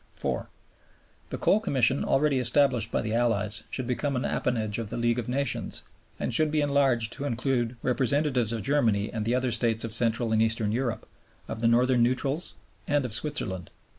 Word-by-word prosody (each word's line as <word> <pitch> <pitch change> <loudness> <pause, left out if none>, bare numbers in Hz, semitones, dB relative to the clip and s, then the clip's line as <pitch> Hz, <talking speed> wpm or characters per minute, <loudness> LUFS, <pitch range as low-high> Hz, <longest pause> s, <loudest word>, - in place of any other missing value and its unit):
(4) - - -3 0.8
The - - -4
Coal 210 - +3
Commission 135 - +2
already 140 -1 +2
established 125 -2 +2
by - - -1
the 110 0 -3
Allies 110 -2 0
should 130 - -4
become 135 +3 -2
an 125 - -1
appanage 110 -4 -1
of 115 -3 -5
the 120 - -4
League 120 0 +1
of 120 - -5
Nations, 135 +1 -1 0.4
and - - -2
should 155 -1 +3
be 155 0 0
enlarged 135 -6 +2
to 145 - -3
include 120 -2 -1
representatives 130 -1 +1
of 115 -2 -3
Germany 115 -8 +1
and 110 -2 -3
the 120 +2 +1
other 125 -1 0
States 115 -1 +2
of 115 -1 -4
Central 115 0 +1
and 110 0 +2
Eastern 110 -1 +1
Europe, 120 0 -2 0.4
of 110 - -6
the 115 - +3
Northern 120 +1 +3
Neutrals, 135 +6 0 0.3
and 145 -2 +1
of 120 - -3
Switzerland. 110 - 0
120 Hz, 185 wpm, -27 LUFS, 115-135 Hz, 0.8 s, Coal